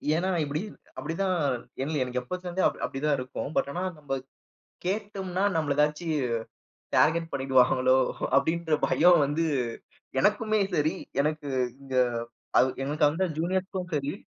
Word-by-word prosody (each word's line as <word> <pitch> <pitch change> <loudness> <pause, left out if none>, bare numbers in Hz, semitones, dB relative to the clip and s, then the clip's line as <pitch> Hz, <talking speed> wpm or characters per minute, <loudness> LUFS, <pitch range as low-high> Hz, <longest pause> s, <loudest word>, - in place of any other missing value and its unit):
ஏன்னா 185 +3 0
இப்பிடி 150 +2 -2 0.4
அப்பிடித்தான். 185 +3 -1 0.5
என்ல 155 +3 -2 0.3
எப்போத்திலிருந்தே 180 +6 -3
அ - - +3 0.2
அப்பிடித்தான் 145 +1 0
இருக்கும். 130 +2 -5
பட், - - +1
ஆனா 175 +5 -3
நம்ப 145 -2 -5 0.7
கேட்டம்ன்னா, 195 -1 -2
நம்மள 150 -3 +1
ஏதாவது 150 +3 +1 0.9
டார்கெட் 165 +1 +3
பண்ணிடுவாங்களோ! 130 -1 +4 0.4
அப்பிடீன்ற 160 -1 +2
பயம் 175 +1 +5
வந்து 150 +4 0 0.8
எனக்குமே 215 +4 +2
சரி, 155 +3 +2 0.3
எனக்கு 150 0 -1 0.3
இங்க 135 -1 -5 0.6
அவ் 130 - +5
எனக்கு 150 +2 +1
அந்த 175 +5 0
ஜூனியர்ஸுக்கும் 185 +2 -2
சரி. 140 0 -1
160 Hz, 120 wpm, -27 LUFS, 145-180 Hz, 0.9 s, பயம்